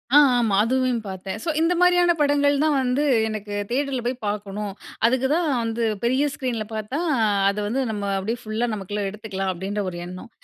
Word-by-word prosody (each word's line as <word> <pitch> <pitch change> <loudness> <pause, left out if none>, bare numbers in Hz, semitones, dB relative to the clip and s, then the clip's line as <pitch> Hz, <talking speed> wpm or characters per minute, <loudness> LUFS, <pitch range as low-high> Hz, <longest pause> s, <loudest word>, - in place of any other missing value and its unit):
ஆ, - - +10 0.2
ஆமா. 220 -5 +2
அதுவையும் 255 -1 +1
பார்த்தேன். 190 0 -5
ஸோ, 335 - -2
இந்த 330 +2 +3
மாரியான 355 -1 +5
படங்கள் 285 0 +3
தான் 310 -1 +3
வந்து 255 +3 +1 0.2
எனக்கு 210 -1 -5 0.2
தியேட்டர்ல 265 0 -1
போய் 250 +1 0
பார்க்கணும். 205 -1 -3 0.3
அதுக்கு 260 +2 +3
தான் 335 -1 +1 0.2
வந்து 230 +1 -2 0.2
பெரிய 260 +4 +2
ஸ்க்ரீன்ல 240 -5 -2
பார்த்தா, 220 +7 -3 0.5
அத 200 - -3
வந்து 260 +5 0
நம்ம 205 -2 -3
அப்டீயே 225 +5 -2
ஃபுல்லா 225 +2 -2
நமக்குள்ள 205 0 -4
எடுத்துக்கலாம் 195 -2 -4
அப்பிடின்ற 195 +4 -3
ஒரு 175 - -7
எண்ணம். 185 +6 -9
230 Hz, 175 wpm, -23 LUFS, 205-265 Hz, 0.5 s, ஆ